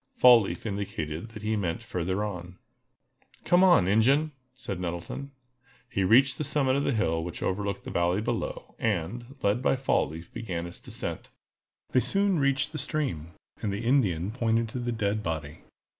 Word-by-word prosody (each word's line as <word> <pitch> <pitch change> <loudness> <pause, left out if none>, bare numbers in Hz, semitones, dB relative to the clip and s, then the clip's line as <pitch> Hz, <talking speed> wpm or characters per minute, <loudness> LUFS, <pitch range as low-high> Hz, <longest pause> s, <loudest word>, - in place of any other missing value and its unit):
Fall 125 -2 +8
leaf 100 - -5
indicated 100 -4 -4
that 105 -2 -10
he 110 +1 0
meant 100 +1 -2
further 95 -1 -2
on. 90 -3 -6 0.9
"Come 175 +1 +4
on, 175 - +6
Ingen," 135 +10 +3 0.2
said 100 -8 -5
Nettleton. 90 +10 -5 0.6
He 100 - 0
reached 130 +7 +5
the - - 0
summit 135 -2 +1
of 140 - +1
the - - +1
hill 80 -9 0
which 85 0 -6
overlooked 100 +1 -2
the - - -7
valley 85 +2 +1
below, 110 - -3
and, 115 - -2
led 105 +4 +2
by 135 - +3
Fall 130 0 +1
leaf, 80 +2 -10
began 95 -8 -4
its 85 0 -8
descent. - - -4 0.6
They 130 - +4
soon 195 +4 +2
reached 140 0 +1
the 155 - -4
stream, 85 - -1 0.3
and 105 - -1
the 100 +4 -4
Indian 105 - +2
pointed 115 -1 0
to 125 - -5
the 120 0 -2
dead 105 -2 -1
body. 80 -5 -4
105 Hz, 175 wpm, -28 LUFS, 90-130 Hz, 0.9 s, Fall